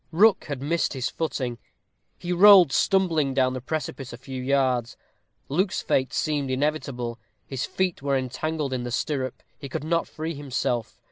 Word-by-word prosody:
Rook 195 +5 +4
had 140 -3 -5
missed 165 +2 0
his 130 -3 -2
footing. 130 -7 -3 0.6
He 175 0 -3
rolled 185 -4 +8
stumbling 160 -9 +2
down 130 -1 +2
the 130 - -4
precipice 135 -2 -4
a 120 - -8
few 130 0 -7
yards. 130 -3 +1 0.5
Luke's 185 +7 0
fate 130 -1 +1
seemed 145 -3 -1
inevitable. 130 -4 -2 0.3
His 135 -2 -3
feet 185 -5 -1
were 140 -1 +1
entangled 140 +2 -2
in 125 - -1
the 120 - -4
stirrup, 130 +1 -2 0.2
he 140 -2 -7
could 135 - -4
not 165 +2 0
free 160 +1 -5
himself. 130 -5 -2
140 Hz, 160 wpm, -25 LUFS, 130-160 Hz, 0.6 s, rolled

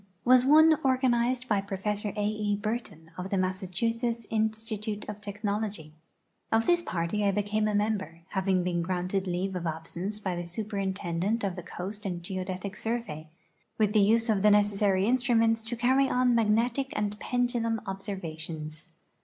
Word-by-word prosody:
was 250 0 +6
one 315 +4 +7
organized 255 -1 +2
by 205 -4 +2
Professor 205 +1 -2
A. 205 - +1
E. 210 -1 0
Burton, 205 -6 -5
of 185 +1 -4
the 195 - 0
Mas 185 +1 0
sachusetts 230 +5 -1
Institute 220 -1 -2
of 210 0 -6
Technology. 205 -5 -3 0.6
Of 225 0 +3
this 345 0 +4
[»arty 175 +4 -1
I 200 - +4
became 210 +2 0
a 210 - 0
member, 205 -5 -1
having 190 -2 +1
been 175 -1 0
granted 185 +2 -1
leave 185 +2 -2
of 175 -1 -2
absence 170 +6 -4
by 190 -4 -2
the 175 0 -4
Superin 200 +1 -2
tendent 190 +5 -1
of 190 -3 -1
the 180 - -6
Coast 195 +5 -7
and 175 -2 -4
Geodetic 185 +2 -4
Survey, 220 -10 -4 0.5
with 210 -2 +2
the 215 - +5
use 225 +3 +4
of 210 -4 +2
the 210 - +6
necessary 205 -2 +3
instruments 230 -2 +3
to 225 +2 -5
carry 260 +3 +3
on 250 -1 +3
magnetic 235 +4 +2
and 210 0 -2
pendulum 240 -2 0
ob 195 -1 -4
servations. 160 -5 -5
210 Hz, 165 wpm, -28 LUFS, 185-225 Hz, 0.6 s, one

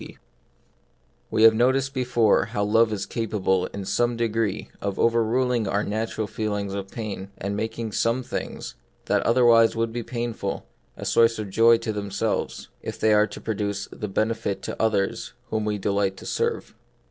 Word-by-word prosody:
T - - -11 1.1
T7E 110 - +3
have 115 0 +9
noticed 130 +4 +2
before 120 -4 +2
how 105 - -2
love 110 +2 +3
is 100 -2 -2
cap 115 -2 -3
able 95 -2 +1
in 100 -1 -7
some 120 +3 +1
degree 115 -3 -1
of 100 -1 -3
overruling 115 0 +2
our 100 +2 0
natural 110 +1 -2
feelings 105 -2 -3
of 100 -1 -5
pain, 100 -4 -6
and 100 - -3
of 100 - -3
making 110 +1 -3
some 115 +4 +1
things, - - -5 0.3
that - - +2
otherwise 115 -2 +5
would 115 0 -1
be 120 - -2
painful, 115 -4 -4 0.3
a - - -6
source 115 0 +4
of 105 -3 -5
joy 115 +3 +6
to 115 -2 -4
ourselves, 105 +1 -2
if - - -6
they 110 -1 +4
are 105 0 +4
produc 100 -3 -4
tive - - -12
of 100 -2 -3
benefit 110 -3 -1
to - - -4
others 105 -3 0 0.2
whom 110 -1 0
we 105 -1 -1
delight 100 -1 0
to - - -11
serve. - - -2
110 Hz, 175 wpm, -25 LUFS, 100-115 Hz, 1.1 s, have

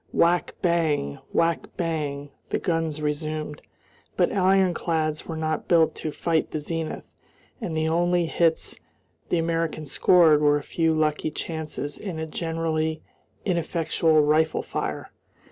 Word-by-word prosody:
"Whack 175 +1 +2
bang, 155 -5 +1
whack 165 0 +1
bang," 145 -4 -2 0.2
the - - 0
guns 165 -4 -1
resumed, 150 0 -3 0.6
but - - +3
ironclads 180 -5 +1
were 165 - -4
not 155 -1 -2
built 165 -2 +4
to 155 - -3
fight 160 +1 0
the 155 - -3
zenith, 160 +1 -4 0.6
and 160 - -3
the 160 0 +1
only 175 +1 +2
hits 165 0 +1 0.5
the - - +2
Americans 165 -3 -1
scored 165 -5 +5
were 145 0 +4
a 145 - -5
few 165 +2 +1
lucky 155 0 +1
chances 155 -2 -5
in 185 -6 -5
a 160 - -3
generally 160 -1 -2 0.4
ineffectual 165 -3 +2
rifle 155 +1 +2
fire. - - -4
160 Hz, 130 wpm, -25 LUFS, 155-170 Hz, 0.6 s, scored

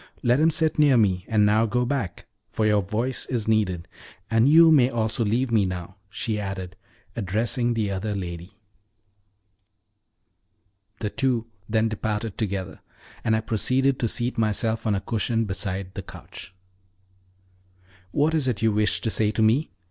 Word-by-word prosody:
"Let 120 +2 +3
him 160 +1 +5
sit 160 -1 +1
near 145 -4 +5
me; 95 -5 +2
and 105 -2 +3
now 110 +2 +3
go 125 +3 0
back, 120 -9 -3 0.2
for 110 - -1
your 105 -1 +3
voice 115 +7 -3
is 120 -4 -2
needed. 95 -6 0 0.4
And 115 +4 +4
you 165 +1 +7
may 130 -5 +5
also 115 -1 -1
leave 120 +4 0
me 110 -3 +3
now," 90 0 -5
she 105 +1 -3
added, 95 -2 -5 0.4
addressing 115 +3 0
the 105 -3 -1
other 100 +2 -3
lady. 90 +1 -7 2.4
The 105 -2 -2
two 125 -4 0 0.2
then 110 0 +2
departed 110 -1 -3
together, 100 -4 -4 0.4
and 110 - +2
I 110 - 0
proceeded 130 +5 +1
to 120 - +1
seat 120 +2 -1
myself 110 +1 0
on 105 - +2
a 95 - -2
cushion 115 +1 -1
beside 95 -1 -3
the - - -5
couch. - - -11 1.6
"What 150 +10 +1
is 150 -5 +1
it 115 -4 -1
you 110 - +4
wish 105 0 +1
to 110 - -1
say 105 -1 +1
to 110 +1 0
me?" 120 +8 +2
110 Hz, 160 wpm, -24 LUFS, 100-120 Hz, 2.4 s, you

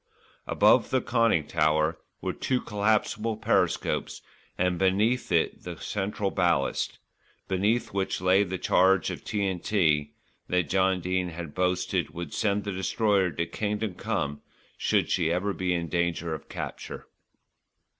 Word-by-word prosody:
Above - - +4
the 130 - +2
conning 115 -10 +2
tower 75 +2 +2 0.3
were - - -2
two 130 -1 0
collapsible 105 +1 0
periscopes, 110 - 0 0.3
and 90 -1 +1
beneath 105 +6 +2
it 85 -2 +1
the - - -7
central 100 0 -2
ballast, 85 -6 0 0.5
beneath 100 +5 0
which 95 -1 -1
lay 95 +2 +4
the 95 -1 -3
charge 95 +1 +3
of - - -7
T.N.T. 90 -7 0 0.4
that 90 -4 0
John 95 -1 +2
Dene 90 0 -1
had 85 -3 -7
boasted 90 0 0
would 85 -3 -6
send 100 -1 0
the 100 - -3
Destroyer 95 0 +1
to 85 0 -2
Kingdom 105 +2 -2
Come 75 -4 -3 0.3
should - - +1
she 85 -3 +2
ever 95 +4 0
be 90 -1 -1
in 85 -1 -1
danger 85 -1 -1
of 75 - -8
capture. - - -6
95 Hz, 135 wpm, -27 LUFS, 85-105 Hz, 0.5 s, Above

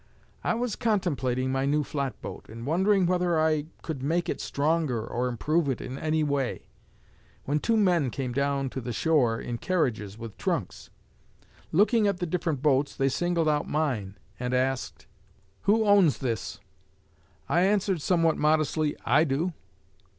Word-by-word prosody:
I - - +1
was 240 -1 -2
contemplating 140 - 0
my 135 +1 0
new 150 +1 +2
flatboat, 140 -2 -5
and 115 +2 -8
wondering 190 +5 +3
whether 175 -2 +1
I 155 -1 +1 0.2
could 155 -5 -4
make 165 +5 0
it - - -2
stronger 145 -6 0
or 125 +2 -2
improve 145 +6 0
it 130 - -1
in 130 +2 -6
any 155 0 0
way, 140 -4 -1 0.8
when 145 +2 +1
two 225 +7 +1
men 175 -9 +3
came 125 0 -4
down 140 0 0
to 130 - -4
the 120 0 -4
shore 125 -6 +2
in 120 -1 -5
carriages 110 - -1
with 115 -3 -9
trunks. - - -3 0.8
Looking 210 +4 +4
at 200 -2 0
the 180 - -2
different 160 -5 -2
boats, 140 -1 +2
they 135 0 +1
singled 170 +3 0
out 150 -1 +1
mine 125 -11 -1 0.2
and 125 0 -1
asked, 130 0 -1 0.6
'Who 220 +2 +4
owns 195 - +5
this?' 115 -5 -3 0.9
I 175 - +2
answered 195 -3 +2
somewhat 165 0 +2
modestly, 155 0 +1
'I 145 +5 +4
do.' 160 +5 -1
150 Hz, 155 wpm, -27 LUFS, 130-175 Hz, 0.9 s, owns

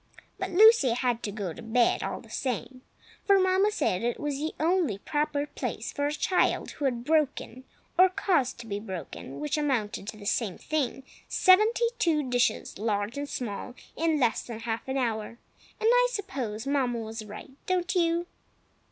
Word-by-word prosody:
But - - -2
Lucy 415 - +6
had 245 -1 0
to 205 - -3
go 200 -5 -4
to - - -10
bed, 235 +1 +2
all - - -4
the - - -17
same, 255 0 -3 0.4
for 400 -1 +5
Mamma 375 +2 +3
said 215 - 0
it 240 0 -1
was 290 -2 -2
the 310 +2 -3
only 325 - +1
proper 295 +5 -1
place - - -5
for 285 -1 0
a - - -1
child 360 +5 +1
who 290 - -4
had 240 -3 0
broken 280 -3 0 0.3
(or 370 +1 +8
caused 350 -8 +1
to - - -11
be 200 -2 -3
broken, 185 -8 -7
which 150 - -1
amounted 235 -9 -1
to 215 - -6
the 205 - -11
same 205 -3 0
thing), 275 -3 -2 0.3
seventy 430 +5 +5
two 305 -5 +2
dishes, 245 -5 0
large 210 0 -1
and 285 0 -4
small, 245 +1 -5 0.2
in 320 -2 +1
less 240 -4 +2
than 230 -2 -8
half 230 +1 -3
an 265 +1 -1
hour. 230 -3 -2 0.4
And 440 - +1
I - - +5
suppose 260 - -4
Mamma 270 -4 +1
was 225 0 -5
right, 210 +5 -10 0.2
don't 365 -1 0
you? 340 -1 +1
265 Hz, 180 wpm, -28 LUFS, 225-330 Hz, 0.4 s, or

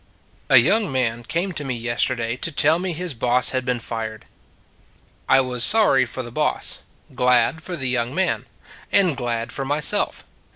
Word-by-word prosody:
A - - +7
young 215 -6 +3
man 120 -3 -1
came 170 +11 -2
to 150 -4 -5
me 130 -3 -3
yesterday 120 0 -1
to 165 - -2
tell 155 +2 +3
me 185 0 -2
his 175 0 -4
boss 125 +1 +1
had 130 -1 -1
been 125 -1 -1
fired. 110 -2 -6 1.0
I 135 - +6
was 125 -2 0
sorry 135 - +4
for 130 +2 -4
the 120 - -9
boss; 150 +5 -1 0.3
glad 125 +5 +2
for 180 +1 -5
the 135 -5 -2
young 125 +1 -1
man; 190 0 -1 0.4
and 185 -7 +3
glad 120 -2 -3
for 135 - -4
myself. 145 +2 +1
130 Hz, 170 wpm, -21 LUFS, 120-155 Hz, 1.0 s, A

